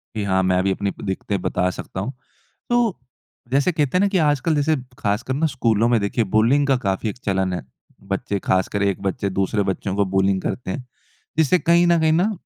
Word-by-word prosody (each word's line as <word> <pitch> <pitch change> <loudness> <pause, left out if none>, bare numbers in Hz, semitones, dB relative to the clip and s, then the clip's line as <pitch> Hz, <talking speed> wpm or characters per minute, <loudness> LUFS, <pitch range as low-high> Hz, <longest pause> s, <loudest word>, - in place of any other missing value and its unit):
कि 105 - -1
हाँ 95 -1 +2
मैं 90 0 +2
भी 95 - +1
अपनी 100 +1 -1
प - - -13
दिक्कतें 95 0 -2
बता 90 -1 0
सकता 90 - -7
हूँ। 115 +8 -3 0.6
तो 240 -4 +2 0.5
जैसे 140 +6 +3
कहते 150 -1 0
हैं - - +3
ना - - +4
कि 195 - +1
आजकल 150 0 +2
जैसे 150 +2 +2 0.2
खासकर 105 +5 -1
ना 150 +5 +1
स्कूलों 115 -5 +1
में 120 -2 +3
देखिए 100 +3 0
बुलिंग 115 +8 +3
का 135 - +4
काफ़ी 100 -1 -1
एक 105 - -7
चलन 95 -2 0
है। 90 - -3 0.5
बच्चे 100 +1 -2
खासकर 95 +2 0
एक 100 -1 0
बच्चे 100 +1 -1
दूसरे 95 +2 0
बच्चों 95 0 -2
को 100 0 +2
बुलिंग 95 0 +1
करते 105 -1 -3
हैं। 125 +5 -5 0.5
जिससे 160 +3 +4
कहीं 170 +1 +4
न 170 -1 +4
कहीं 160 0 +3
ना, 180 +7 +2
105 Hz, 210 wpm, -22 LUFS, 95-145 Hz, 0.6 s, ना